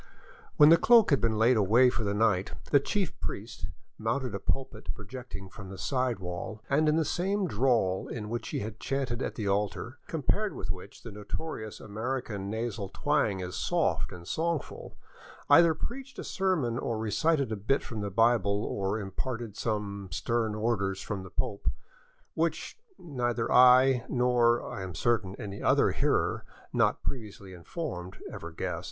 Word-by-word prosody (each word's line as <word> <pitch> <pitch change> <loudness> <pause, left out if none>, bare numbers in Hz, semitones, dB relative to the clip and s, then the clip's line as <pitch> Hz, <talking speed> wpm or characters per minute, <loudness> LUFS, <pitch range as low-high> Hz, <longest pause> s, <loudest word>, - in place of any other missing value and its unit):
'' - - -23
When 150 0 +9
the 165 - +8
cloak 230 +2 +6
had 140 - +4
been 115 -2 +1
laid 115 +3 +4
away 115 +5 +5
for 120 -2 -2
the 100 -1 0
night, 105 -3 +2 0.2
the 140 - +7
chief 190 +4 -2
priest 105 -6 -5 0.3
mounted 115 +2 -1
a 100 - -3
pulpit 135 +6 -3
projecting 105 -2 -8
from 95 0 -10
the 95 - -8
side 130 0 0
wall, 95 +4 -6
and 155 +2 +4
in 150 - +3
the 160 -1 +2
same 195 +5 0
drawl 115 - +1
in 110 -3 -5
which 115 0 -4
he - - -2
had 110 +1 -6
chanted 135 -3 -2
at - - -3
the 105 -3 -3
altar, 100 +3 -1
compared 195 +7 0
with - - -3
which 95 +2 -9
the 115 - -8
notorious 110 +2 -6
American 110 -2 -4
nasal 110 -2 -3
twang 130 -11 0
is 90 0 -5
soft - - 0
and 85 -1 -10
songful, 165 -2 -3 0.5
either 165 -1 +7
preached 260 - -6
a - - -5
sermon, 160 -12 0
or 115 - -2
recited 135 +5 +1
a - - 0
bit 110 +8 0
from 110 -3 -5
the 100 - -2
Bible, 105 -1 +3
or 100 +1 -1
imparted 115 +2 -4
some 100 -4 -3
stern 110 +5 0
orders 100 -4 0
from 100 -2 -4
the 95 - -9
Pope 100 - -2 0.4
— - - -36
which, - - -1 0.2
neither 120 -7 -2
I 125 0 +7
nor, 120 -1 +3
I - - -5
am 95 -3 -6
certain, 110 -4 0
any 100 -1 -7
other - - +4
hearer - - +1 0.3
not - - +2
previously 105 -6 -6
informed 90 - -6
ever - - -7
guessed. - - -3
115 Hz, 170 wpm, -29 LUFS, 100-135 Hz, 0.5 s, When